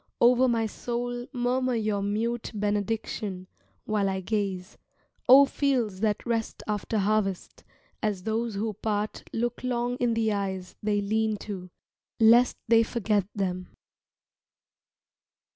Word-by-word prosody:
Over 250 +2 +5
my 230 -2 +1
soul 245 +2 -4
murmur 250 0 0
your 215 -3 0
mute 225 +4 -1
benediction 205 -2 -2 0.4
While 210 -2 +1
I 190 0 -1
gaze, 195 -1 -3 0.5
oh 275 +2 +10
fields 250 -9 0
that 210 -1 0
rest 230 -2 -2
after 210 +1 -1
harvest, 200 -2 -1 0.4
As 205 -4 -1
those 225 +1 -1
who 215 +2 -2
part 210 +1 -3
look 240 +2 -2
long 245 0 -1
in 240 -2 +1
the 220 -1 +1
eyes 190 -2 -3
they 205 -1 +1
lean 215 +1 0
to, 185 -3 -6 0.5
Lest 235 +2 +6
they 230 0 +6
forget 215 -4 0
them. 185 -2 -2
220 Hz, 125 wpm, -27 LUFS, 200-235 Hz, 0.5 s, oh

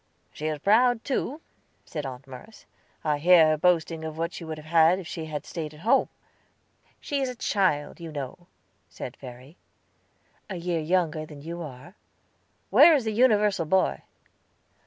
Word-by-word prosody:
"She 155 - -4
is 155 -1 -2
proud, 225 - +3
too," 280 +3 -2 0.4
said 150 -4 -5
Aunt 130 +1 -9
Merce. 135 - -13 0.4
"I 150 -2 0
hear 165 0 +6
her 155 - +3
boasting 165 -1 +1
of 160 0 -6
what 165 +1 -2
she - - -8
would 160 -1 -6
have 155 - -11
had 165 +2 +4
if 185 -3 -8
she 165 -2 -5
had 150 -2 -5
stayed 155 -2 -6
at 150 - -15
home." 240 +7 +3 0.9
"She 285 -1 -2
is 265 - -1
a 250 - -6
child, 185 -9 0
you 165 -1 -8
know," 145 +4 -7 0.4
said 125 - -8
Verry. 130 +4 -12 0.9
"A 190 - -4
year 175 -1 -2
younger 160 -1 0
than 145 -2 -12
you 170 +2 -6
are." 150 +3 -10 0.8
"Where 335 - +8
is 275 - 0
the 220 - 0
universal 210 -7 +3
boy?" 190 +4 +1
165 Hz, 170 wpm, -26 LUFS, 150-190 Hz, 0.9 s, Where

